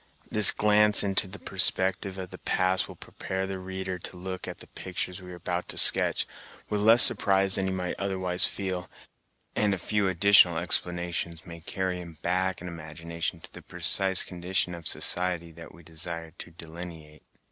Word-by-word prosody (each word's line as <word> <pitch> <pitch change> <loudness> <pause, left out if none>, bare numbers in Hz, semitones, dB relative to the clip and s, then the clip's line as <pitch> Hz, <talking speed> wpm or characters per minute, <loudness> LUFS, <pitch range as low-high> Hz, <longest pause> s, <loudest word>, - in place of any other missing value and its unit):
This 105 -2 +8
glance 105 0 +4
into 100 0 0
the 100 +2 -9
perspective 95 0 0
of 95 -1 -8
the - - -11
past 95 0 0
will - - -12
prepare 95 0 -6
the 95 -1 -6
reader 95 0 -6
to 90 - -6
look 95 0 -7
at - - -7
the - - -12
pictures 90 0 -7
we 90 0 -11
are - - -9
about 90 +1 -5
to - - -6
sketch, - - +4 0.4
with 105 -1 -2
less 115 +3 +7
surprise 95 -1 +3
than 95 -1 +1
he - - -2
might 90 -1 -4
otherwise 95 -2 -1
feel; 95 -2 -5 0.7
and 105 -2 +1
a - - -7
few 105 +3 -1
additional 95 -2 +5
explanations 85 -1 -3
may 85 -2 -10
carry 95 +2 -3
him 85 -3 -12
back 95 +1 -1
in 90 - -8
imagination 85 +1 -6
to - - -15
the - - -10
precise 95 +2 +4
condition 90 0 -1
of 85 -3 -6
society 90 -2 +1
that 85 +1 -13
we 85 +2 -17
desire 80 0 -7
to - - -9
delineate. 80 -2 -11
90 Hz, 180 wpm, -26 LUFS, 85-95 Hz, 0.7 s, This